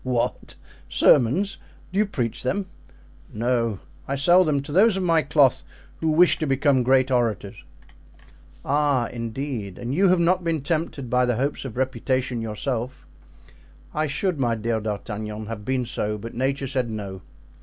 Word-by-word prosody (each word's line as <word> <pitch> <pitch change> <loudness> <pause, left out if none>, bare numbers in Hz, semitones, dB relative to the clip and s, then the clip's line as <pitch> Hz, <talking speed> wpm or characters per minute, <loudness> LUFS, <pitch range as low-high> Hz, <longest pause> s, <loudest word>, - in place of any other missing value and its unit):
"What! 125 -2 -2 0.3
sermons? 150 - +3 0.4
Do 195 - +1
you 210 - +3
preach 120 - -2
them?" 195 +10 -1 0.7
"No; 115 -2 0 0.3
I 140 - -1
sell 175 +7 +5
them 145 -4 0
to 145 - -8
those 195 +5 +4
of 190 - -1
my 165 -2 +3
cloth 135 -4 +3 0.4
who 160 - 0
wish 170 +3 +4
to 155 - -1
become 135 0 +2
great 130 +1 +3
orators." 120 -5 -1 1.0
"Ah, 140 -4 +1
indeed! 115 -4 -5
and 120 +2 -4
you 190 +5 +4
have 180 -1 +4
not 180 +2 +2
been 165 -3 -1
tempted 150 -3 -2
by 125 +1 +2
the 120 - +1
hopes 140 +4 -2
of 125 -3 -7
reputation 130 -1 -1
yourself?" 120 +3 -4 0.9
"I 155 0 0
should, 155 +3 -1
my 120 -3 +1
dear 115 +1 -1
D'Artagnan, 105 0 -5
have 105 -1 -6
been 130 0 0
so, 105 -3 -2
but 115 +3 -8
nature 135 +2 -1
said 130 -3 -1
'No. 100 -4 -6
130 Hz, 160 wpm, -24 LUFS, 115-150 Hz, 1.0 s, sell